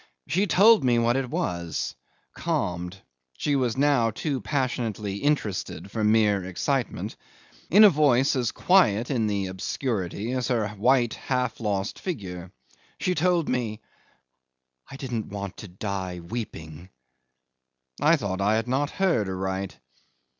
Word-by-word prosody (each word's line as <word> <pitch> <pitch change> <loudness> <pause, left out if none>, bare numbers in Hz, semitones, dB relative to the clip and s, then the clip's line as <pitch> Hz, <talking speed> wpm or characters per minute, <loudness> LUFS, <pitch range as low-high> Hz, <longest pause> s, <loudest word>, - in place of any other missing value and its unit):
She 195 +4 +1
told 205 0 +6
me 120 -2 +3
what 120 +1 +2
it 135 -2 -1
was, 85 -6 -2 0.4
calmed 90 +2 -2 0.4
she 145 - 0
was 125 -4 0
now 135 -5 +3
too 130 +4 -3
passionately 115 -5 -2
interested 105 -7 -2
for 110 0 -2
mere 105 -2 +3
excitement 120 +8 -2 0.5
in 210 +4 +7
a 210 - +10
voice 140 -3 +3
as 125 -3 0
quiet 125 - +3
in 115 -5 +1
the 100 -2 -1
obscurity 95 +2 -3
as 125 -2 -1
her 115 -5 0
white 120 +4 +2
half 125 -3 -2
lost 100 -3 -2
figure. 95 - -5 0.5
She 180 - +1
told 175 -1 +2
me, 115 -4 -1 1.1
"I - - -9
didn't 125 -5 -4
want 100 -1 -5
to 105 - -8
die 95 -1 -4
weeping." 85 -4 -7 1.1
I 160 +3 +6
thought 100 - -3
I 105 +2 +3
had 115 +2 -1
not 135 +3 0
heard 170 - +1
aright. 95 0 -3
115 Hz, 135 wpm, -26 LUFS, 100-135 Hz, 1.1 s, a